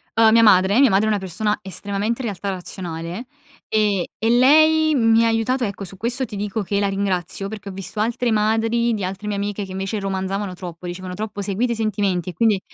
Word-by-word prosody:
Uhm, 225 -1 +6
mia 230 +1 +6
madre 200 0 +5
mia 275 -2 +6
madre 195 +2 +3
è 220 - +1
una 210 - +1
persona 210 +3 -2
estremamente, 200 +5 -3
in 240 - -3
realtà, 200 -1 -4
razionale 175 +2 -6 0.4
e 210 -4 +1
e 225 - +1
lei 310 +5 +5
mi 225 -2 +4
ha - - +3
aiutato 230 +3 0
ecco, 200 -2 -4
su 195 +1 -9
questo 245 +6 -2
ti 210 - -9
dico 205 +1 -3
che 200 +1 -1
la 200 - +1
ringrazio, 195 -1 -2
perché 210 -2 -7
ho - - -6
visto 195 +2 -6
altre 235 +2 0
madri 225 +2 +1
di 205 - -4
altre 190 +3 -4
mie 205 - -1
amiche 205 +1 -3
che, 190 - -8
invece, 195 +2 -3
romanzavano 195 0 -3
troppo, 175 -1 -8
dicevano 180 +1 -6
troppo: 205 +1 -5
"Seguite 220 +5 0
i - - -4
sentimenti" 200 -5 -1
e 180 - -6
quindi 215 +1 +2
205 Hz, 215 wpm, -21 LUFS, 190-225 Hz, 0.4 s, Uhm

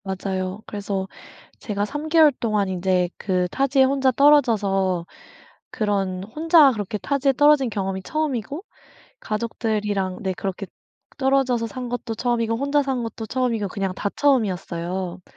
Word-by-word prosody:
맞아요. 190 +1 -4
그래서 200 -2 -4 0.5
제가 205 -2 -2
3 295 +6 -5
개월 315 -2 +6
동안 215 -3 0
인제 180 -1 +1
그 180 -2 0
타지에 270 +4 +2
혼자 265 0 +2
떨어져서 205 - +3 0.7
그런 195 -5 -1
혼자 305 - +5
그렇게 210 -1 -4
타지에 275 +5 +1
떨어진 290 -1 +4
경험이 195 -2 -3
처음이고 295 - -3 0.6
가족들이랑 210 -4 -2
네 190 -1 -1
그렇게 195 +1 -4 0.5
떨어져서 265 -4 +1
산 250 +3 -6
것도 240 -2 -4
처음이고 230 -1 0
혼자 280 +3 +1
산 265 -3 -2
것도 225 -1 -6
처음이고 235 -5 -1
그냥 195 -1 -3
다 200 - -2
처음이었어요. 185 -8 -1
220 Hz, 320 characters per minute, -23 LUFS, 190-265 Hz, 0.7 s, 개월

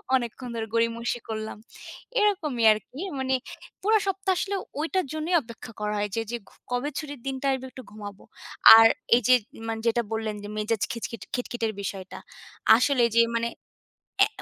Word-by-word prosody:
অনেকক্ষণ 250 0 -3
ধরে 225 -1 -3
গড়িমসি 230 +1 0
করলাম, 215 -1 -4 0.6
এরকমই 320 - +1
আর 215 - +3
কি। 265 - -11 0.2
মানে 265 0 0 0.5
পুরা 435 +3 +4
সপ্তাহ 385 0 0
আসলে 400 +2 -1 0.2
ওইটার 330 +4 0
জন্যই 315 +3 0
অপেক্ষা 230 -2 -11
করা 210 0 -1
হয় 205 0 -1
যে, 225 - 0
যে 240 - -2
ঘ - - -26 0.2
কবে 250 +4 -1
ছুটির 290 -3 -5
দিনটা 270 0 -3
আসবে 260 0 -4
একটু 260 - -10
ঘুমাবো। 205 -2 -9 0.5
আর 225 0 +9 0.3
এই 245 - +3
যে 255 - +7 0.3
মানে 225 0 -3
যেটা 230 +1 +2
বললেন 220 -1 -2
যে - - -6
মেজাজ 215 0 -1
খিচখিচ 230 -2 -5
খিটখিটের 240 -2 -2
বিষয়টা। 195 -1 -6 0.6
আসলে 255 +3 +2
এই - - -9
যে - - +9 0.2
মানে 230 0 -1 0.7
অ্যা - - +5
240 Hz, 170 wpm, -26 LUFS, 225-280 Hz, 0.7 s, আর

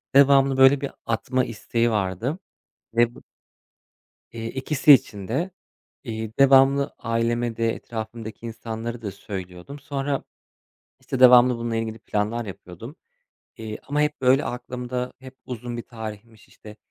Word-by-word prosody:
Devamlı 135 -1 +6
böyle 135 +1 +6
bir 140 - -3
atma 125 +3 0
isteği 115 +1 -1
vardı 105 - -1 0.6
ve 120 0 +3
bu - - -14 1.1
Eee, 115 -1 -6
ikisi 135 +2 +4
için 110 -7 +2
de. 165 +11 -1 0.5
Eee, 110 -3 -4
devamlı 135 +1 +5
aileme 115 0 -1
de 115 -1 +1
etrafımdaki 115 0 -7
insanlara 115 +1 -6
da 100 - -3
söylüyordum. 95 +6 -8
Sonra 140 -1 -3 0.8
işte 130 - -4
devamlı 125 -1 +8
bununla 115 -1 -3
ilgili 115 0 -3
planlar 110 +2 -2
yapıyordum, 100 - -10 0.6
eee, 110 -1 -6
ama 145 +1 0
hep 150 -1 0
böyle 130 +2 +4
aklımda 125 0 -4
hep 130 0 -12
uzun 120 -1 -6
bir 120 - -5
tarihmiş 110 -1 -10
işte 105 0 -14
120 Hz, 130 wpm, -24 LUFS, 110-135 Hz, 1.1 s, devamlı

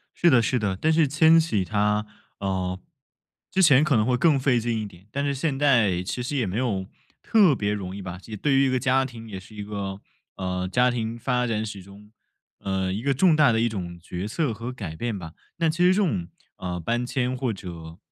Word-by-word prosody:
是 170 - +4
的 125 -3 +5
是 125 +2 0
的， 100 -3 -1
但 160 - +2
是 160 -2 +4
迁 160 +3 +5
徙 110 - 0
它， 105 +1 0 0.3
呃， 95 -1 -2 0.7
之 190 - +2
前 145 -4 +6
可 150 -5 +2
能 110 0 +3
会 125 0 +2
更 145 0 +3
费 130 -3 +2
劲 115 -1 -1
一 - - -4
点， 95 +1 -17
但 140 +3 -2
是 140 -1 0
现 140 0 -1
在 115 -11 +3
其 125 +6 -4
实 135 +4 -3
也 125 -5 +1
没 95 +4 -3
有 105 -7 -1 0.4
特 200 - +5
别 105 -2 -1
容 95 -2 -4
易 100 - -7
吧， 90 -1 -6
及 110 - -14
也 105 - -5
对 135 +6 +1
于 135 0 +4
一 - - +2
个 130 -1 +1
家 130 0 +2
庭 115 -3 -9
也 95 -2 -6
是 105 +3 -15
一 105 - -5
个， 100 -1 -5 0.3
呃， 90 -1 -3
家 125 0 +3
庭 115 -1 -3
发 125 0 0
展 110 -1 -1
史 100 -2 -7
中， 100 +3 -15 0.5
呃， 95 -1 -1
一 105 +4 -3
个 140 +1 +1
重 160 +4 +4
大 150 -5 +5
的 115 - +1
一 120 - +2
种 90 -5 -5
角 90 +3 -5
色 140 +1 -1
和 115 +4 -6
改 95 -11 -7
变 115 +1 -3
吧。 80 -2 -9 0.2
但 165 -1 +2
其 170 - -8
实 185 - +6
这 - - -1
种， 90 - -1 0.3
呃， 90 -1 -4
搬 120 +8 -1
迁 125 0 -1
或 125 -2 -1
者 85 -4 -9
115 Hz, 255 characters per minute, -25 LUFS, 95-135 Hz, 0.7 s, 前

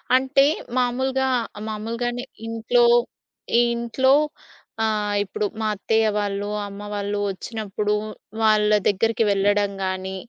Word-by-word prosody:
అంటే 265 +2 +4 0.3
మామూలుగా, 260 +2 +1 0.4
మామూలుగానే 230 +3 -3 0.2
ఇంట్లో, 230 +2 +2 0.7
ఈ - - +6
ఇంట్లో 235 +3 +2 0.7
ఆహ్, 210 -2 0
ఇప్పుడు 205 +1 -3 0.2
మా 220 - 0
అత్తయ్య 220 +2 +1
వాళ్ళు 205 0 -2 0.2
అమ్మ 200 0 -9
వాళ్ళు 205 0 -2
వచ్చినప్పుడు 210 0 -3 0.5
వాళ్ళ 215 -1 +4 0.2
దగ్గరికి 225 +3 +2
వెళ్ళడం 200 0 +2
గానీ, 190 0 -3
215 Hz, 105 wpm, -23 LUFS, 205-240 Hz, 0.7 s, ఈ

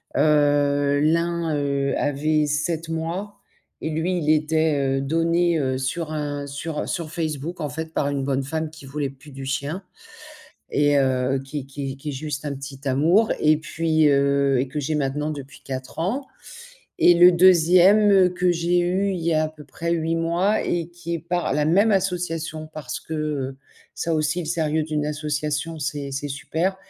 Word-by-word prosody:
Heu, 145 -1 +3
l'un, 165 +1 +1
heu, 140 -1 0
avait 150 +1 +1
7 155 +2 -1
mois 170 +6 -3 0.5
et 160 - -3
lui, 170 +4 -1
il 155 -2 +1
était, 155 -3 +1
heu, 135 - -1
donné, 165 +3 +1
heu, 130 -2 0
sur 155 +5 -3
un 145 -2 -3
sur, 150 +2 -5
heu, - - -3
sur 160 -3 -3
Facebook 160 +1 -4
en 150 - -2
fait 160 +3 -6
par 140 - 0
une 140 -1 -2
bonne 135 0 0
femme 155 +2 -3
qui 155 -3 -13
voulait 140 -1 -3
plus 140 +2 -16
du 135 0 -8
chien. 145 +7 -3 0.9
Et 145 0 +3
heu, 130 0 +1
qui 135 0 -6
qui 135 0 -6
qui 150 +2 -6
est - - -2
juste 145 +1 -5
un 145 - -2
petit 135 0 -8
amour 165 +12 +3
et 155 0 +4
puis, 160 -1 +1
heu, 140 -1 +3
et 130 - 0
que 150 +3 -4
j'ai 150 +2 -2
maintenant 150 +2 -1
depuis 140 -2 -9
4 130 -1 -6
ans. 250 +11 -1 0.7
Et 175 - +6
le 175 +1 +8
2e 185 +2 +6
que 180 0 +2
j'ai 175 +1 +1
eu, 190 +3 +1
il 180 - -3
y 165 0 0
a 155 0 +2
à 155 - -2
peu 155 -1 -14
près 170 +5 -3
8 165 0 0
mois 170 +6 +1
et 170 -1 -1
qui 170 -1 -5
est - - -2
par 175 -2 -1
la 150 0 +1
même 200 +7 +4
association 165 -4 -2
parce 145 -5 -5
que, 160 - -7
heu, 145 -4 -3 0.4
ça 165 - -2
aussi 155 +3 0
le 160 - -5
sérieux 160 -1 0
d'une 150 -1 -2
association, 150 +1 -2
c'est 145 -1 -3
c'est 140 +2 -4
super 160 +7 -2
155 Hz, 185 wpm, -23 LUFS, 140-170 Hz, 0.9 s, le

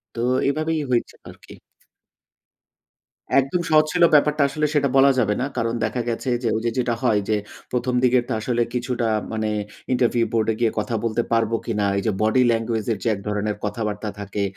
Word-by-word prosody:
তো 115 - -5 0.3
এভাবেই 155 +1 -1
হয়েছে 120 - 0
আর - - -11
কি। - - -12 1.9
একদম 135 +7 -1
সহজ 155 0 +5
ছিল 175 -1 +3
ব্যাপারটা 150 0 +4
আসলে 150 +1 -1
সেটা 140 -2 +2
বলা 135 +1 +6
যাবে 105 -3 +1
না। - - +1
কারণ 115 0 0
দেখা 120 +3 -2
গেছে 115 +3 -3
যে, - - +1
ওই 110 - -1
যে, 115 - +1
যেটা 120 -2 0
হয় 105 -2 +3
যে, 110 - +2 0.3
১ম 125 0 -1
দিকের 125 -1 +4
তো - - 0
আসলে 120 +2 -1
কিছুটা 120 -1 -1 0.2
মানে 110 -1 -1 0.4
ইন্টারভিউ 120 -1 +2
বোর্ডে 110 -1 +1
গিয়ে 115 -2 +2
কথা 115 +2 -2
বলতে 115 +1 0
পারবো 115 0 +2
কিনা। 105 -3 -1
এই 100 - 0
যে, 110 - +2
বডি 110 +4 +3
ল্যাঙ্গুয়েজ 115 -1 -1
এর - - -5
যে, - - -1
এক - - -9
ধরনের 105 0 -1
কথাবার্তা 105 0 -3
থাকে। 100 0 -3
115 Hz, 190 wpm, -22 LUFS, 110-130 Hz, 1.9 s, বলা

